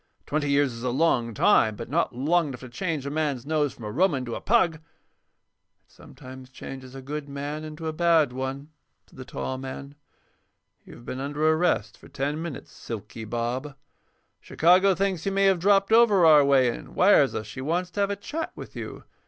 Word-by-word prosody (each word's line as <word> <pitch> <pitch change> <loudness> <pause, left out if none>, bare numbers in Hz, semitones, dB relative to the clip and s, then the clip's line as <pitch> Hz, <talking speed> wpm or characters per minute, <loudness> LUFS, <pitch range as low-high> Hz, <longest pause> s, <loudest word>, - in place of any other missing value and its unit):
"Twenty 145 0 -1
years 140 -2 +2
is 115 - -9
a 125 - -1
long 125 -4 +1
time, 110 +1 +4
but 115 - -7
not 150 -2 -1
long 160 +6 +1
enough 130 -4 -8
to 130 - -9
change 155 +1 -3
a 140 - -3
man's 145 -5 -2
nose 150 -2 0
from 120 - -13
a 105 - -4
Roman 145 - +1
to 120 - -5
a - - -5
pug." 185 -8 +2
"It - - -24 1.0
sometimes 130 0 -13
changes 130 0 -10
a 135 - -9
good 145 +1 -6
man 145 +2 -5
into 155 +1 -8
a 160 - -2
bad 160 -5 +3
one," 135 +3 -5 0.4
said - - -18
the 130 - -7
tall 130 +1 -5
man. 135 +1 -8 0.9
"You've 120 - -14
been 130 - -5
under 145 +3 -1
arrest 160 - +1
for - - -15
ten 145 +3 -3
minutes, 165 -5 -7
'Silky' 110 0 -8
Bob. 120 +5 -3 0.6
Chicago 185 +3 +3
thinks 190 -1 -1
you - - +1
may 195 0 +2
have 190 -2 +3
dropped 195 +2 +3
over 220 -6 +5
our 150 -2 +7
way 135 -3 +4
and - - -12
wires 180 -8 +4
us 110 - -3
she 110 +6 -8
wants 175 +6 -1
to 205 - -6
have 200 0 +2
a 200 - -1
chat 300 +11 -5
with - - -10
you. - - -7
145 Hz, 200 wpm, -25 LUFS, 130-170 Hz, 1.0 s, our